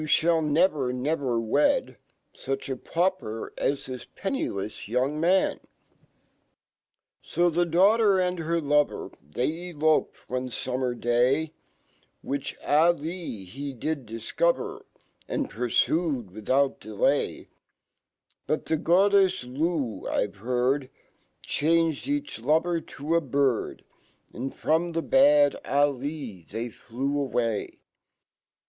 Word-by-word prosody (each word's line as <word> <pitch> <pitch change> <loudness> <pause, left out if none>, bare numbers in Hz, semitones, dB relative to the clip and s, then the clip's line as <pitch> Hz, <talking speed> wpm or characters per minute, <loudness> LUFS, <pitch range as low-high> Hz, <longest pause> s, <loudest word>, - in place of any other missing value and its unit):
1 155 0 +2
never, 150 -5 +2
never 130 -2 -1
wed 145 - +1 0.4
Such 135 +1 -4
apauper 165 -4 -2
as 140 0 -1
this 125 -2 -6
pennileft 110 - -4
young. 130 +6 0
man) 180 +4 +2 1.6
Sfhe 175 0 +1
daughter 200 +3 +4
and 180 -1 0
herlovor, 155 -3 +1
They 150 - -3
eloped 155 -1 +2
onefummer 125 0 -3
day, 130 +7 +2 0.7
\Vhich 140 0 -3
Ah 160 +4 +4
Lee 160 - -6
he 135 +8 -6
did 140 0 -3
difcover, 425 - -1 0.4
And 285 -2 -2
purfued 125 - 0
without 130 +7 +1
delay; 105 -1 -1 1.0
But 155 - -1
fhe 160 -1 0
Gddef$ 190 -7 +3 0.5
L,I*ve 100 - -1
heard 125 +4 0 0.5
Changed 165 - +1
each 285 - -2
lover 160 +6 +2
to 155 +3 -3
a>bird, 140 -6 0 0.5
And 130 +3 -4
from 165 +2 0
tKe 165 0 -3
bad 290 +1 +5
Ah 145 +1 +3
Lee 140 - -5
they 115 +8 -5
fle/w 135 +5 -3
Ah - - +2 0.2
me! - - -10
145 Hz, 105 wpm, -26 LUFS, 125-170 Hz, 1.6 s, bad